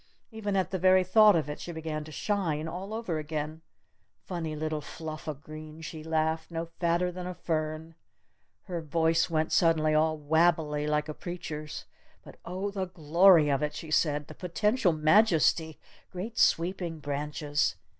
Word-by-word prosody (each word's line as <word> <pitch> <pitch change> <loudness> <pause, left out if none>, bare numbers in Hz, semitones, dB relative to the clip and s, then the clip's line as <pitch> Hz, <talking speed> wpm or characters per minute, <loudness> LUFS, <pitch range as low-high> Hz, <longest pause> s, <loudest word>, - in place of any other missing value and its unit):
Even 210 -3 -3
at 190 -1 0
the 190 - -2
very 185 +1 +5
thought 210 +2 +6
of 155 -3 0
it 150 - -5
she 175 - -6
began 160 -2 -4
to 155 - -11
shine 165 -5 -1
all 185 +5 -6
over 220 -8 -3
again! 155 +1 -4 0.6
"Funny 165 -4 -4
little 155 0 -2
fluff 155 +1 -8
o' 155 - -2
green," 155 +2 -10
she 160 -1 -7
laughed, 160 0 -1
"no 165 0 -3
fatter 175 +1 +1
than 180 0 -6
a 180 - -5
fern!" 155 0 -3 0.7
Her 175 -3 -4
voice 160 +1 +1
went 160 -1 0
suddenly 160 -2 +3
all 155 +1 +2
wabbly 155 -1 +2
like 150 0 0
a 155 - -4
preacher's. 160 -3 -6 0.4
"But, - - -13
oh, 190 +3 -3
the 195 -1 -2
glory 170 -1 +5
of 140 - +1
it!" 150 0 -2
she 160 - -7
said. 150 -2 +2
"The - - -11
potential 210 +3 +1
majesty! 160 -1 +3 0.3
Great 205 +6 -6
sweeping 170 -1 +1
branches 145 0 -1
160 Hz, 165 wpm, -29 LUFS, 155-180 Hz, 0.7 s, thought